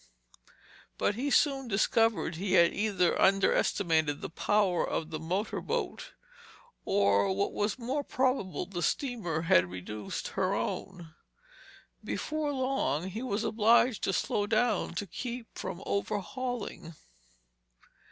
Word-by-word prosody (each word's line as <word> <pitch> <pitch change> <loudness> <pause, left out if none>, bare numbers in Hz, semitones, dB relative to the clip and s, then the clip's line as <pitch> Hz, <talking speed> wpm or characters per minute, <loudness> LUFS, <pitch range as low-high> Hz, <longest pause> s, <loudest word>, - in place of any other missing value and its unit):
But - - +1
he 255 +7 -2
soon 275 -2 +2
discovered 225 -2 +2
he 185 +3 -2
had 170 -2 +5
either 200 -5 +1
underestimated 165 -5 +2
the - - -6
power 195 0 +2
of 160 0 -3
the 155 - -3
motor 185 +7 -2
boat - - -3 0.7
or, 100 - +3
what 200 +1 -1
was 210 +3 -1
more 260 +4 -2
probable, 255 -9 0
the 175 -3 -5
steamer 195 - -1
had 90 - +4
reduced 95 +4 -5
her - - 0
own. 175 -4 -4 0.9
Before 305 -1 -2
long 260 - -1
he 215 +5 -5
was 225 -4 -2
obliged 230 +2 +3
to - - +1
slow 205 +2 0
down 220 -1 +1
to 205 - -2
keep 240 +6 -6
from 190 0 -6
overhauling. 215 - -3
205 Hz, 125 wpm, -30 LUFS, 175-240 Hz, 0.9 s, had